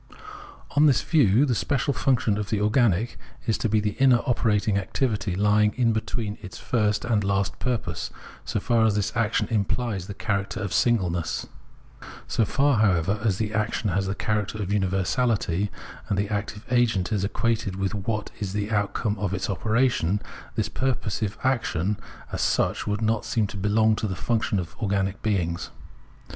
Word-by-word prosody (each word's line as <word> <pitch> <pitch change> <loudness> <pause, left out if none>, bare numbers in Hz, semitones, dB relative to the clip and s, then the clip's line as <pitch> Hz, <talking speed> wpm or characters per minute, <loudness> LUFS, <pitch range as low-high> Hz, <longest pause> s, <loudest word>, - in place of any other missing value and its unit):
On 150 +2 +5
this 135 - +3
view 140 - +4
the 130 - +1
special 140 +3 0
function 115 -6 +1
of 105 - -4
the 105 - 0
organic 105 0 +2 0.3
is 115 -3 +1
to 115 - 0
be 110 +1 +3
the 105 0 0
inner 130 -3 +5
operating 110 -4 +1
activity 105 -2 -1
lying 105 +2 +3
in 120 -3 +2
between 110 -1 -3
its 90 - -9
first 105 -3 0
and 110 -4 +1
last 100 -1 0
purpose, 115 -9 -2 0.3
so - - -2
far 115 +2 +2
as 110 -2 +3
this 105 +2 -1
action 115 -2 +1
imphes 105 -2 -1
the 100 - -6
character 100 -2 -2
of 100 -2 -3
singleness. 90 -9 +1 0.8
So 115 - +1
far, 140 +2 +2
however, 100 -1 +2
as 100 -5 +1
the 110 -1 -2
action 110 -1 0
has 95 +2 0
the 95 - -2
character 105 -1 -1
of 100 -1 -2
universality, 95 0 +1 0.4
and 100 - +1
the 100 +1 0
active 105 0 -3
agent 115 -6 +2
is 100 -3 0
equated 110 -1 -1
with 95 +1 -1
what 105 +1 -3
is 100 -3 -3
the 105 +1 -2
outcome 105 0 0
of 100 -2 -1
its 95 +2 -2
operation, 110 -2 +1 0.4
this - - 0
purposive 110 -5 -2
action 105 -7 0 0.3
as - - -2
such - - +1
would 105 +2 -1
not 110 0 +1
seem 115 -1 0
to 100 - -7
belong 110 +3 +3
to 110 - -1
the 95 - -3
function 115 +1 0
of 85 -2 -4
organic 95 -2 -1
beings. 90 -6 -1
105 Hz, 170 wpm, -25 LUFS, 100-115 Hz, 0.8 s, On